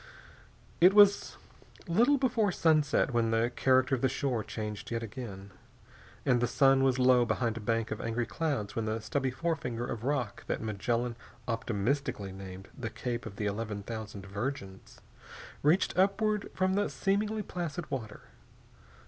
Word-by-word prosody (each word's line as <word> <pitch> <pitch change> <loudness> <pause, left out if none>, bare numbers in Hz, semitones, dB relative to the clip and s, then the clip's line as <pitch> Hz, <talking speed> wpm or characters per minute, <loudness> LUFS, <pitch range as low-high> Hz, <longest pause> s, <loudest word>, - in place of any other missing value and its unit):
It 185 +3 +6
was 205 -1 +5 0.5
little 235 +12 +4
before 230 -6 +2
sunset 155 -5 +2
when 115 -1 +2
the 115 +2 +1
character 130 0 +3
of 130 - +1
the 130 - +3
shore 125 -3 -1
changed 105 -1 -5
yet 115 -1 -2
again, 100 -4 -7 0.7
and 125 -2 +3
the 120 - +2
sun 135 0 +4
was 130 -1 +3
low 125 -1 +5
behind 115 0 0
a - - -4
bank 115 +1 -1
of 110 - -3
angry 115 +1 -1
clouds 110 -2 -2
when 115 - -1
the 110 +1 -1
stubby 130 +5 -1
forefinger 125 -5 -2
of 115 -2 -5
rock 130 -6 -2
that - - -1
Magellan 115 +3 -2 0.3
optimistically 115 -1 -1
named 95 0 -9
the 115 - -4
Cape 120 0 -4
of 100 - -9
the 105 - -3
Eleven 105 0 -3
Thousand 110 -3 -6
Virgins 100 -1 -6 0.6
reached 160 +6 +3
upward 200 +2 +1
from 185 0 +1
the 205 +1 +1
seemingly 210 +2 0
placid 175 -3 -5
water. 110 -6 -5
120 Hz, 155 wpm, -30 LUFS, 110-155 Hz, 0.7 s, It